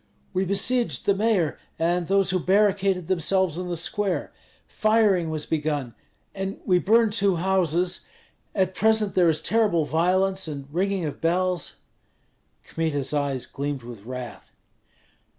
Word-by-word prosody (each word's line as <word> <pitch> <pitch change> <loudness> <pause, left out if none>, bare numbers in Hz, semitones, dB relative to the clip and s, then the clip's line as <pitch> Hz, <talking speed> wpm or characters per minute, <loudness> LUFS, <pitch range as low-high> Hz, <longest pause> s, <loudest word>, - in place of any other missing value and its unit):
We 190 +1 0
besieged 225 +6 +1
the 200 - +4
mayor 195 -6 +1 0.2
and 170 +1 0
those 195 -1 +2
who 185 - +1
barricaded 195 -2 +2
themselves 185 -1 +1
in 180 -1 -4
the 175 - -1
square. 195 +3 -1 0.3
Firing 215 -6 +2
was 155 -1 -3
begun, 145 -6 -2 0.4
and 195 0 -4
we 180 -2 +3
burned 220 +2 +3
two 200 -3 +2
houses; 180 0 0 0.5
at 190 -2 +1
present 220 +1 +2
there 175 -2 +4
is 155 - 0
terrible 210 -8 +2
violence, 185 +5 +1
and 140 -3 -6
ringing 190 0 0
of 150 - -6
bells 180 0 0 0.5
" - - -44
Kmita's 150 -4 -2
eyes 140 -3 -1
gleamed 140 -2 -4
with 120 -3 -10
wrath. 125 +3 -8
180 Hz, 140 wpm, -24 LUFS, 160-195 Hz, 0.5 s, the